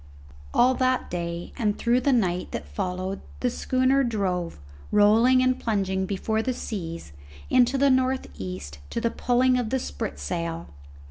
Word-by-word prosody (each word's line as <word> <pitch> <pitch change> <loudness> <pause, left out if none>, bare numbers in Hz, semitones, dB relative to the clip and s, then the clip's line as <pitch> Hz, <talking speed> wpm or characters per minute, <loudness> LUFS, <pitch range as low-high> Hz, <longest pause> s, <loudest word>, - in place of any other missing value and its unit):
All 255 +2 +4
that 255 0 0
day 170 -1 -4
and 210 -3 +1
through 245 +2 +2
the 280 - +2
night 180 -8 +1
that 75 - -5
followed 185 - -3 0.2
the 250 - +1
schooner 260 +3 +2
drove, 190 -7 -1 0.3
rolling 225 +5 +5
and 255 0 +2
plunging 190 -4 -1
before 220 +3 -1
the 255 +3 -1
seas, 165 - -6 0.4
into 255 +1 +4
the 275 0 +4
north 260 0 +1
east, 90 -7 -7
to - - -2
the 230 0 0
pulling 250 +1 +2
of 235 -3 -2
the 265 - +1
spritsail. 165 - -4
220 Hz, 150 wpm, -25 LUFS, 175-255 Hz, 0.4 s, rolling